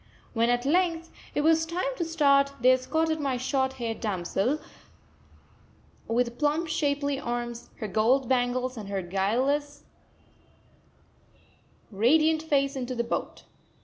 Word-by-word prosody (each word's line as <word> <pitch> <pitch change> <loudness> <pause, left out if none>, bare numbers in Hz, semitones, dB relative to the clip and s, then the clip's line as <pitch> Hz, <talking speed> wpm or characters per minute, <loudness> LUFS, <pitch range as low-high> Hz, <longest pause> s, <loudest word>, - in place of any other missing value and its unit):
When, 230 0 +2
at 245 +1 +1
length, 335 +1 +1 0.2
it - - +2
was 320 +1 +4
time 360 +10 -2
to 345 - -1
start, 280 -4 +3
they 250 +2 +5
escorted 315 +5 +1
my 275 -3 -1
short 265 +1 0
haired 235 -4 -4
damsel, 205 - -1 1.5
with 240 +1 -1
plump 305 +3 +1
shapely 285 -2 0
arms, 240 -2 -4
her 215 - -5
gold 235 +6 +2
bangles 255 0 0
and 205 -3 -7
her 195 -2 -2
guileless, 245 +11 -1 2.1
radiant 310 +10 +3
face, 275 -3 +1
into 255 -1 -4
the 235 - 0
boat. 235 - -4
265 Hz, 125 wpm, -27 LUFS, 240-305 Hz, 2.1 s, they